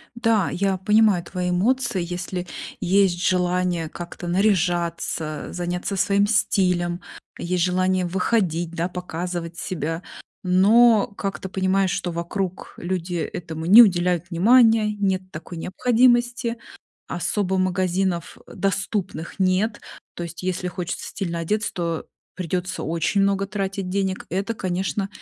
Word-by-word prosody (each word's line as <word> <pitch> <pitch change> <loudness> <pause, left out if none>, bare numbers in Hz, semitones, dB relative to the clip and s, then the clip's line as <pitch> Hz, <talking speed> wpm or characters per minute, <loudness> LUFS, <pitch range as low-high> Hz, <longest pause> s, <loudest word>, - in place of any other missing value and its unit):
Да, 225 -5 +2
я 195 0 0
понимаю 210 -2 +3
твои 180 0 -3
эмоции. 215 +1 +1
Если 180 +1 -4 0.3
есть 185 -1 +3
желание 180 -2 +1
как-то 175 +1 -8
наряжаться, 175 -5 0
заняться 180 +2 -3
своим 200 +2 +2
стилем, 180 -5 +1 0.4
есть 175 0 -1
желание 185 0 +1
выходить, 175 -2 0
да, 170 +1 -2
показывать 175 -1 -5
себя, 165 -3 -3 0.4
но 210 +5 +5
как-то 195 -1 -4
понимаешь, 190 0 +1
что 180 -2 -2
вокруг 175 +2 -4
люди 175 0 -3
этому 160 -1 -4
не 215 +7 +10
уделяют 180 -4 +3
внимания, 220 +3 +5
нет 190 -2 +1
такой 165 +2 -8
необходимости. 240 +4 +2 0.5
Особо 190 -2 -1
магазинов, 185 -1 0
э, - - -13
доступных 195 -3 -2
нет. 190 +4 +1 0.3
То - - -6
есть 170 0 -7
если 180 0 -1
хочется 180 0 -5
стильно 170 -4 -3
одеться, 210 +6 -1
то 170 -2 -2 0.3
придётся 180 0 -3
очень 170 +5 0
много 195 0 +1
тратить 195 -1 -3
денег. 190 -1 -1
Это, 195 +5 -1
конечно, 190 +1 -2
185 Hz, 120 wpm, -23 LUFS, 175-200 Hz, 0.5 s, не